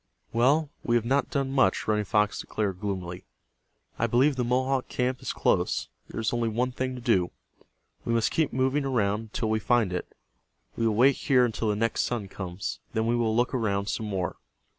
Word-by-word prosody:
"Well, 140 +6 +3
we 120 - +1
have 115 -1 +2
not 135 +4 +1
done 140 -4 -1
much," 130 -9 +2
Running 105 -1 +1
Fox 105 +1 +1
declared, 100 -4 -2
gloomily. 95 -3 -4 0.8
"I 115 - +2
believe 130 +5 +3
the 125 - 0
Mohawk 130 +2 +1
camp 125 0 -1
is - - -3
close. - - +1 0.2
There - - -5
is 110 +1 0
only 120 -1 +1
one 125 +3 0
thing 130 +1 -3
to 125 - -7
do. 95 -8 +2 0.7
We - - -2
must 115 -1 +2
keep 160 -3 +1
moving 130 +3 +1
around 105 -6 +1
until 110 0 -3
we 110 - +2
find 110 -4 +2
it. 90 - -4 0.6
We 115 - +1
will 110 - +1
wait 130 +4 +5
here 130 -3 +3
until 110 -1 -1
the 105 - +1
next 115 +2 0
sun 110 -5 -2
comes. 90 -9 -5
Then 110 0 0
we 120 +1 +2
will 115 -2 +1
look 120 +3 +1
around 100 -5 0
some 110 - -2
more." 95 -4 -2
115 Hz, 200 wpm, -27 LUFS, 105-130 Hz, 0.8 s, wait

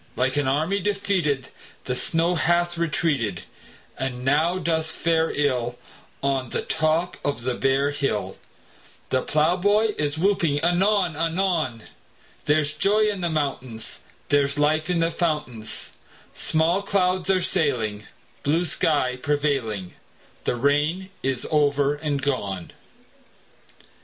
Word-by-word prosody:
Like 130 +1 +1
an 145 -2 +1
army 160 +9 +1
defeated 185 -9 0 0.4
The 125 - -1
snow 165 +6 +1
hath 175 0 +2
retreated, 145 - 0 0.5
And 125 -1 -4
now 155 +6 +3
doth 160 -2 0
fare 165 0 +1
ill 125 -4 0 0.5
On 135 -2 0
the - - -2
top 160 +3 0
of 140 -5 -1
the 130 0 0
bare 135 +3 +1
hill; 105 -10 -2 0.7
The 130 - +2
plowboy 185 +10 +2
is 145 0 -1
whooping 170 -5 +2
anon 180 0 +2
anon: 165 - 0 0.6
There's 150 0 +2
joy 210 +6 +3
in 200 -3 -5
the 175 - 0
mountains; 135 -7 -3 0.3
There's 140 0 +2
life 155 +3 +2
in 175 -2 +1
the 165 0 +2
fountains; 150 -10 -3 0.4
Small 165 +4 +1
clouds 185 -2 +1
are 190 -1 +4
sailing, 115 - 0 0.3
Blue 160 +7 +1
sky 145 -5 +1
prevailing; 135 -10 -1 0.5
The - - +1
rain 150 +9 +1
is 135 -2 -1
over 145 -2 +3
and 145 -1 -2
gone! 100 -10 -2
150 Hz, 120 wpm, -24 LUFS, 135-175 Hz, 0.7 s, are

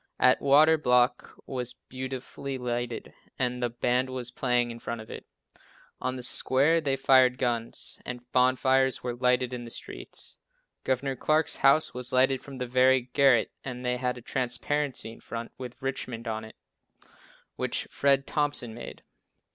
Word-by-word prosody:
Atwater 145 +5 +5
block 125 -2 +2
was 125 -2 -3
beautifully 130 +1 -6
lighted 120 -1 -4 0.2
and 125 -1 -1
the 120 - +1
band 125 +2 0
was 125 -1 -4
playing 125 -1 +1
in 115 - -9
front 115 +1 -5
of 110 - -10
it. - - -9 0.7
On 130 0 -2
the 125 - -5
square 140 +6 +3
they 140 -3 0
fired 130 -1 +4
guns, 120 -2 -2
and 125 0 -7
bonfires 130 +1 +3
were 125 -1 -2
lighted 125 0 +1
in 120 -1 -5
the 120 - -8
streets. - - -7 0.5
Gov. 130 0 -1
Clark's 155 0 +2
house 140 +3 +4
was 125 0 0
lighted 130 +1 +3
from 140 -2 -9
the 125 - -3
very 130 0 +3
garret 135 -4 +4
and 125 -1 -6
they 125 0 0
had 125 0 -2
a - - -9
transparency 130 0 -1
in - - -13
front, 115 0 -7
with 125 +1 -9
"Richmond" 125 -3 -4
on 110 -1 -3
it, 110 - -13 1.0
which - - -2
Fred 140 -1 +2
Thompson 145 -6 0
made. 120 - -9
125 Hz, 155 wpm, -28 LUFS, 120-135 Hz, 1.0 s, Atwater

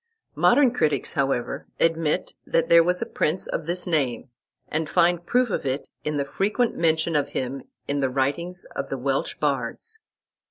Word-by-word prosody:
Modern 275 -4 +4
critics, 150 - 0
however, 135 -3 -1
admit 165 -2 +1
that 165 - 0
there 170 0 +8
was 180 +1 +1
a - - -5
prince 165 +5 -1
of 160 - -4
this 175 +1 -1
name, 140 -7 -1 0.4
and 155 -1 -2
find 175 -1 +3
proof 250 -2 +2
of - - -1
it 135 +1 -2 0.2
in 150 -1 -1
the 140 - 0
frequent 210 - 0
mention 160 0 +1
of 145 -2 +2
him 130 +1 -3 0.3
in 145 0 -1
the 135 -1 +1
writings 145 +7 -1
of - - -3
the - - -3
Welsh - - -1
bards. 445 -1 -2
160 Hz, 170 wpm, -24 LUFS, 140-180 Hz, 0.4 s, there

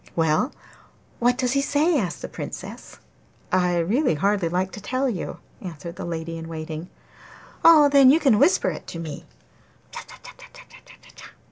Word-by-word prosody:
'Well, 160 - +1 0.7
what 245 +1 +2
does 250 -2 0
he 275 +1 +2
say?' 290 +3 +2
asked 180 -6 -4
the - - -3
Princess. - - -8 0.5
'I 180 -1 +2
really 220 - +1
hardly 195 +1 +1
like 185 +2 -1
to 205 - -9
tell 255 +5 -1
you,' 205 -9 -4 0.2
answered 170 -1 -8
the - - -6
lady 165 -1 -5
in 165 - -8
waiting. 160 +1 -6 0.7
'Oh, 315 -3 +8
then 275 -2 +6
you 300 +5 +5
can 260 -10 +3
whisper 185 0 +3
it 155 - -9
to - - -7
me. 160 -2 -7
190 Hz, 145 wpm, -23 LUFS, 165-260 Hz, 0.7 s, Oh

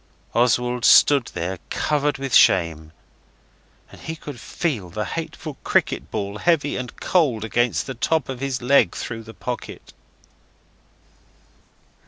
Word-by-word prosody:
Oswald 125 0 +1
stood 140 -2 +6
there 90 +2 -3
covered 150 -1 0
with 135 -2 -5
shame, 80 -4 +4 1.0
and - - -14
he 160 - -5
could 145 -5 -9
feel 115 - -3
the 105 +5 -4
hateful 160 -3 -6
cricket - - 0
ball 100 +1 -4
heavy 155 0 +1
and 125 -1 -6
cold 135 - +1
against 120 +3 0
the - - -5
top 155 +4 0
of 130 -2 -5
his 135 -2 -3
leg, 140 +3 +4
through 115 -1 -5
the 115 0 -12
pocket. 125 -2 -7
125 Hz, 130 wpm, -22 LUFS, 110-145 Hz, 1.0 s, stood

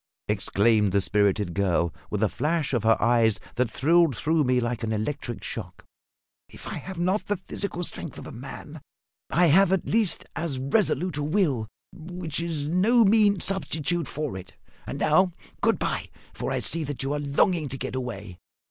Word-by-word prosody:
exclaimed 105 0 +2
the 100 - +4
spirited 100 -1 +1
girl, 85 -4 +1 0.2
with 105 +1 -1
a - - +4
flash 150 +5 -1
of 120 - +2
her 110 0 +4
eyes 115 -2 +3
that 125 -2 0
thrilled 160 -1 +3
through 160 0 +2
me 125 -1 +2
like 120 -1 -2
an 110 - -2
electric 115 +2 -3
shock. - - -7 0.6
"If - - -12
I - - -4
have 190 -1 -8
not 185 +5 0
the 205 - 0
physical 180 0 -3
strength 165 -3 -3
of - - -9
a - - -8
man, 140 +5 -9 0.5
I 175 +2 +3
have 180 +4 +5
at 190 -2 +1
least 220 -4 +1
as 160 -4 -2
resolute 175 +3 0
a 145 - -1
will, 150 - +1 0.3
which 165 -2 -5
is 160 -4 -2
no 215 +8 +4
mean 205 -2 +4
substitute 175 -4 0
for 150 -5 -4
it. 95 0 -9 0.3
And - - -4
now, 180 +4 +3 0.3
good - - +3
bye; - - -2 0.2
for - - -4
I - - 0
see 165 -1 0
that 145 -2 -3
you 135 +2 -1
are 150 - -1
longing 145 +3 +1
to 135 0 -4
get - - -5
away. 105 -8 -6
145 Hz, 185 wpm, -26 LUFS, 115-175 Hz, 0.6 s, have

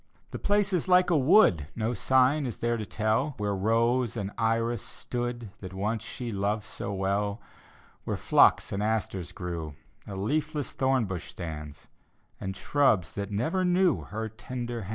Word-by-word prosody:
The - - -5
place 205 -1 +1
is 180 -1 0
like 180 0 +5
a - - +4
wood; 130 - +5
No 115 +2 -1
sign 130 +3 +3
is 120 - -5
there 120 0 0
to 110 -3 -4
tell 110 +7 0
Where 105 -1 -1
rose 115 +4 +1
and 100 -2 -3
iris 115 0 0
stood 120 -3 -4
That 95 -1 -8
once 105 +3 -1
she 120 +1 -5
loved 100 +1 -1
so 100 - -5
well. 100 +2 -1 0.6
Where - - -2
phlox - - +4
and 100 - -2
asters 105 -5 -1
grew, 85 -5 -5 0.3
A 100 - -6
leafless 150 +8 -1
thornbush 115 -11 0
stands, 75 -4 -7 0.5
And 95 0 -5
shrubs 110 - +2
that 100 -1 -4
never 125 - 0
knew 180 -3 +3
Her 110 +1 -5
tender 120 +1 -5
hands. 95 - -8
110 Hz, 160 wpm, -28 LUFS, 100-130 Hz, 0.6 s, like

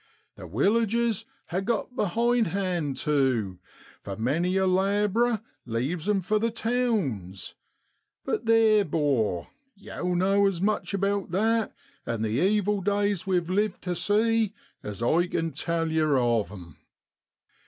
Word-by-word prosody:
1 90 - -10
The - - -17
willages 225 - +1 0.3
ha' 180 +2 0
got 235 +3 -2
behindhand 195 - 0
tu, 130 -11 0 0.4
for 100 -1 -6
many 165 +11 0
a 190 - +2
lab'rer 205 +4 +2 0.3
leaves 140 - -2
'em 200 -2 +2
for 210 +4 +1
the 230 +2 +1
towns; 210 - -2 0.7
but 225 - -2
theer, 220 -2 +5
'bor, 135 - 0 0.3
yow 180 -3 -4
know 195 +3 +3
as 190 -4 -1
much 205 +1 0
about 200 0 -1
that, 220 +5 +1 0.3
and 115 -1 -2
the - - -1
evil 205 0 +1
days 200 -1 0
we've 180 -3 +1
lived 205 +1 0
tu 180 - -2
see, 215 +3 +1 0.3
as 105 +2 -6
I 170 +8 +2
ken 165 -1 -2
tell 165 -1 -2
yer 155 -3 +2
of 115 -6 +1
'em.' 85 -6 -11
185 Hz, 135 wpm, -26 LUFS, 145-210 Hz, 0.7 s, theer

